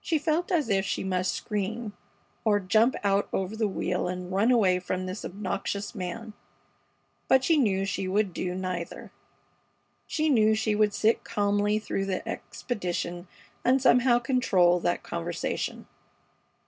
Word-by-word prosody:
She 325 - +1
felt 320 +4 0
as 315 -7 +2
if 195 -3 +2
she - - -2
must 185 -1 0
scream 210 +1 -3 0.5
or 210 -2 +3
jump 215 +6 +3
out 200 0 +2
over 190 +2 -2
the 220 -1 +1
wheel 180 -2 -1
and 180 0 -5
run 200 +5 +2
away 195 -7 +4
from 185 0 -3
this 185 +3 -5
obnoxious 200 +1 -4
man, 215 +3 -5 0.9
but 265 0 +4
she 330 - +4
knew 200 -9 +2
she 195 -1 -2
would 195 0 +1
do 180 +1 -3
neither. 185 -2 -5 1.0
She 310 0 0
knew 220 -6 +4
she 220 0 0
would 210 0 +2
sit 220 +1 +2
calmly 205 0 +1
through 195 -2 -2
the 185 -1 -3
expedition 175 -5 -4 0.4
and 260 +2 +4
somehow 245 -1 +5
control 210 -8 +3
that 175 0 -1
conversation. 170 0 -3
205 Hz, 145 wpm, -27 LUFS, 185-230 Hz, 1.0 s, somehow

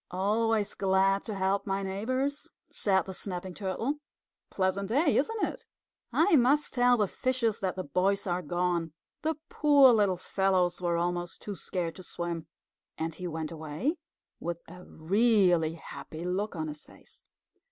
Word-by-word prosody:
"Always 210 +3 +1
glad 195 0 +2
to 215 - -4
help 195 +1 0
my 195 0 -1
neighbors," 255 +9 -2 0.2
said 190 -3 +3
the 190 - -6
Snapping 185 -1 -5
Turtle. 220 - -2 0.5
"Pleasant 190 +1 -1
day, 285 +5 +3
isn't 440 +10 +1
it? - - -6 0.5
I 335 +2 +4
must 280 +4 +3
tell 245 -1 +4
the 210 -2 +2
fishes 245 -1 0
that 190 -4 -1
the 185 - -3
boys 185 +6 +1
are 180 -1 -1
gone. 175 -1 -1 0.3
The 320 +1 0
poor 285 -4 +6
little 200 -4 +3
fellows 185 -1 +1
were 170 -1 +1
almost 175 0 -2
too 205 - -5
scared 170 0 -3
to 185 - -9
swim." 170 -2 -4 0.5
And 160 +1 -2
he 180 +3 -5
went 160 -1 -4
away 160 - -3 0.4
with 170 0 -3
a 180 +2 -11
really 180 -2 +3
happy 160 0 -8
look 195 +3 -2
on 160 -1 -3
his 150 -1 -8
face. - - -18
190 Hz, 155 wpm, -29 LUFS, 175-225 Hz, 0.5 s, poor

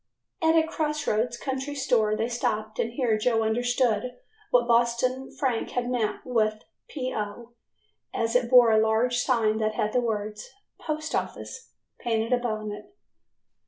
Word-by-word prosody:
At 320 0 +4
a 320 -1 +4
cross 300 -2 -2
roads 235 +3 0
country 270 +2 -4
store 220 -6 +2
they 220 +2 -1
stopped 220 -2 -2
and 230 - -1
here 240 -4 +1
Joe 225 0 +2
understood 245 0 0 0.3
what 240 -1 +3
Boston 240 +2 +1
Frank 250 -5 -1
had 245 0 0
meant 220 -4 -1
with 215 -3 0 0.2
"P. 255 -3 -4
O.", 215 +3 -5 0.6
as 230 +1 -1
it 245 -1 +2
bore 245 -2 +7
a 220 - +5
large 225 +3 +2
sign 225 -4 +1
that 215 0 0
had 210 - -1
the 250 - +3
words 215 - -3 0.3
"Post 310 0 -4
Office" 470 - -4 0.3
painted 230 0 0
upon 215 -4 -1
it. 375 - -10
235 Hz, 155 wpm, -26 LUFS, 220-255 Hz, 0.6 s, bore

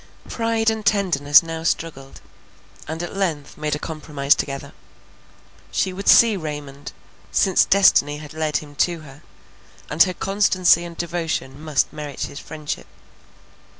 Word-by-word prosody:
Pride 225 -1 0
and 220 -1 -4
tenderness 175 -9 +4
now 165 -1 -5
struggled, 155 -5 -3 0.7
and 160 +3 -4
at 175 - -6
length 165 -8 -2
made 150 -1 -2
a - - -3
compromise 150 -3 0
together. 140 -1 -5 1.0
She 185 - 0
would 195 +2 -7
see 230 -2 +7
Raymond, 145 -4 -7 0.4
since 190 -3 +3
destiny 150 -7 +4
had 150 0 -10
led 155 -1 -1
him 145 -1 -9
to 170 +2 0
her, 145 -1 -14 0.7
and 150 +3 +1
her 185 -1 +5
constancy 185 -3 +2
and 170 -1 -10
devotion 165 -5 -3
must 155 -3 0
merit 150 -2 -7
his 140 - -4
friendship. 155 -2 -6
160 Hz, 140 wpm, -21 LUFS, 145-185 Hz, 1.0 s, see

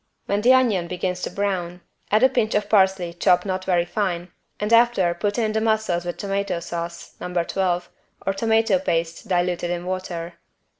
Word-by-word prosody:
When 200 +1 0
the 245 +4 +5
onion 220 -9 +3
begins 180 +1 -3
to - - -2
brown 180 -2 -2 0.3
add 215 +3 +3
a 260 - +7
pinch 220 -4 0
of 210 0 +1
parsley 190 -4 +3
chopped 180 +1 +3
not 185 -1 -3
very 175 -2 +2
fine 175 -2 -2 0.3
and 210 +2 0
after 230 -7 +4
put 205 +5 -2
in 220 -2 +1
the 220 0 0
mussels 215 -6 0
with 175 - -4
tomato 195 -3 -2
sauce 170 0 -6
(No. 180 - -5
12) 180 -1 -1 0.4
or 195 - +1
tomato 220 -1 +2
paste 165 -2 -2
diluted 175 -1 0
in 175 0 -3
water. 175 -2 -5
185 Hz, 180 wpm, -23 LUFS, 175-210 Hz, 0.4 s, a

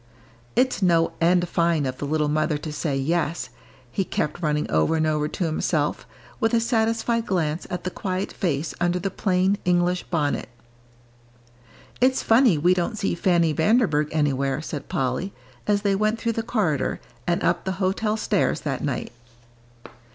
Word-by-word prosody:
"It's 255 -3 +2
no 170 -3 +3
end 175 +1 +3
fine 170 -3 +1
of 130 -1 -4
the - - -3
little 155 0 +1
mother 155 0 +1
to 150 +1 -6
say 150 -3 -1
'yes,'" 165 +4 -1 0.4
he 195 - 0
kept 150 -2 -2
running 150 -2 0
over 80 - +2
and 160 0 +1
over 150 -1 +1
to 175 - -3
himself, 155 -2 -1 0.3
with 225 +1 +2
a - - +4
satisfied 230 0 0
glance 165 -3 -1
at 180 - -4
the 185 - -3
quiet 185 +1 -3
face 160 -5 -1
under 175 0 +2
the 190 +2 -2
plain, 190 +1 +1
English 180 0 +2
bonnet. 150 -7 -1 1.5
"It's 260 +1 +3
funny 225 - +5
we 175 +5 +4
don't 185 +5 -1
see 200 - 0
Fanny 170 -2 +2
Vanderburgh 160 - +2
anywhere," 140 -3 0
said 150 -2 -6
Polly, 135 +9 -1 0.3
as 205 0 +2
they 200 -1 +2
went 215 +3 +1
through 230 0 -1
the 225 - -1
corridor 200 - 0 0.3
and 175 0 +1
up 170 0 +1
the 190 - -2
hotel 200 +3 0
stairs 210 -2 0
that 135 -4 -3
night. 140 -4 -2
175 Hz, 165 wpm, -24 LUFS, 150-200 Hz, 1.5 s, funny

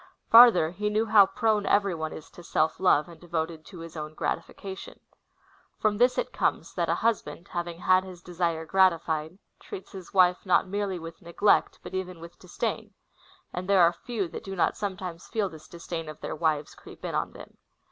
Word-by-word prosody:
Farther, 225 -9 +8
he 210 +4 -2
knoAv 215 +1 0
how 205 -3 +8
prone 220 -3 +1
eveiy 200 -3 +2
one 160 -1 -4
is 155 - -10
to - - -13
self 160 -2 0
love, 150 -5 +3
and 170 -1 -14
devoted 165 -2 -3
to 180 -4 -11
his 165 -1 -9
OAvn 155 -1 -7
gratification. 190 +5 -5 0.8
From 215 -1 0
this 245 +1 +4
it - - -2
comes, - - -1
that - - -1
a - - +2
husband, 215 -6 -1
having 175 -1 -4
had 185 +1 +4
his 180 -2 -11
desire 170 -2 -2
gratified, 165 -3 +1 0.2
treats 190 - -9
his 190 -3 -9
Avife 180 -2 +3
not 185 0 +3
merely 200 -1 -2
Avith 165 0 -9
neglect, 175 +4 +2
but - - -9
even 185 -1 -4
Avith 170 +1 -12
dis 180 -1 -15
dain; - - -3 0.6
and 185 +2 -5
there 195 -3 +6
are 170 +1 +5
few 210 +1 -4
that - - -8
do 195 0 -6
not 175 - +1
sometimes 185 -4 -5
feel 215 -4 -1
this 155 -2 -13
disdain 170 -2 -6
of 155 - -9
their - - -5
Avives 155 -2 -1
creep - - -12
in - - -3
ujjon - - -2
them. - - -13
180 Hz, 200 wpm, -27 LUFS, 165-200 Hz, 0.8 s, Farther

